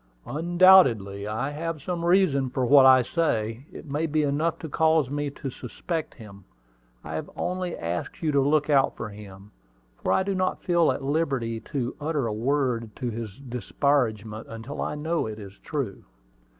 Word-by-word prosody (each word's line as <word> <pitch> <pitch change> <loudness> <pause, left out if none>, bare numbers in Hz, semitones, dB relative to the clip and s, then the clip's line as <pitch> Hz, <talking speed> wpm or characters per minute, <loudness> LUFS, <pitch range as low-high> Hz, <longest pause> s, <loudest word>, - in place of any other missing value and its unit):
"Undoubtedly 150 - +4
I 115 +7 -2
have 160 +1 -4
some 170 +3 -4
reason 170 -7 +3
for 130 0 -1
what 135 +1 +7
I 130 -1 +7
say. 120 -5 -1
It - - -10
may 150 +3 -2
be 155 0 +1
enough 150 +3 0
to 160 - -7
cause 160 -2 +2
me 145 0 -2
to 140 -1 -6
suspect 155 +7 -5
him. 100 -4 -13 0.6
I - - -7
have 80 - -4
only 180 -1 -3
asked 85 - -4
you 155 - +2
to 140 -1 +3
look 145 +2 +2
out 140 -3 +3
for 110 - -5
him, 100 -1 -12 0.5
for - - 0
I 190 - +3
do 195 +1 -1
not 185 0 -1
feel 170 -2 +3
at 140 - -4
liberty 135 -6 -1
to 125 -4 -2
utter 150 -3 -1
a 110 - -2
word 120 -2 -1
to 125 -3 -3
his 110 -3 -6
disparagement 120 -4 -1
until 115 +6 -7
I - - -2
know 160 -1 -1
it 110 -1 -6
is 100 -2 -11
true." 140 -10 -4
140 Hz, 175 wpm, -26 LUFS, 115-160 Hz, 0.6 s, what